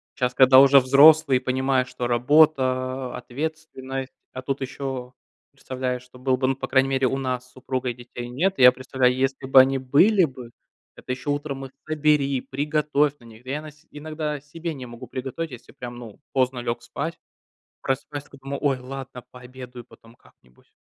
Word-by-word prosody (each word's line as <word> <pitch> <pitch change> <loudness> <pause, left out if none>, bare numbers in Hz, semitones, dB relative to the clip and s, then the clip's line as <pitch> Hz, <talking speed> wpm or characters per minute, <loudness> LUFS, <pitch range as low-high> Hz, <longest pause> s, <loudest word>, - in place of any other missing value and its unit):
щас, 125 -1 -1
когда 130 0 +7
уже 140 0 +8
взрослые, 140 +1 +6
понимаешь, 130 0 0
что 125 -1 -5
работа, 130 -1 +2
ответственность, 135 -1 -6 0.2
а 130 - -6
тут 135 +1 -3
еще, 135 -1 -5 0.4
представляешь, 125 -1 -4
что 125 0 -17
было 130 0 +1
бы. 130 0 0
Ну, 135 - +1
по - - -5
крайней 135 0 +3
мере, 135 -1 +1
у 135 - -1
нас 130 -2 -3
с - - -24
супругой- 130 -1 -3
детей 120 0 -9
нет. 175 +11 -1
И - - +2
я 125 - +9
представляю: 130 -1 0
если 135 +1 -1
бы 130 0 +8
они 135 +1 +1
были 170 +10 +4
бы, 125 -4 -10 0.4
это - - -8
еще 130 +3 -6
утром 145 -1 -3
их 130 - -11 0.2
собери, 150 -3 +1
приготовь 150 0 0
на - - -20
них. 115 0 -15
Да 130 - -9
я 150 +2 -3
на 155 - -10
се 150 +2 -26
иногда 150 -1 -5
себе 165 +3 -6
не 130 -3 -8
могу 120 +1 -10
приготовить, 135 +6 -5
если 125 - -12
прям, 120 -1 -9
ну, 115 -4 -11
поздно 130 -1 +1
лег 120 0 -3
спать. 165 +4 -5 0.6
Просыпаюсь 140 +2 -3
такой, 140 - -16
думаю: 140 0 -4
ой, 140 -3 +1
ладно, 125 -1 -8
пообедаю 125 -1 -11
потом 115 0 -19
как-нибудь. 65 - -26
130 Hz, 185 wpm, -24 LUFS, 125-140 Hz, 0.6 s, я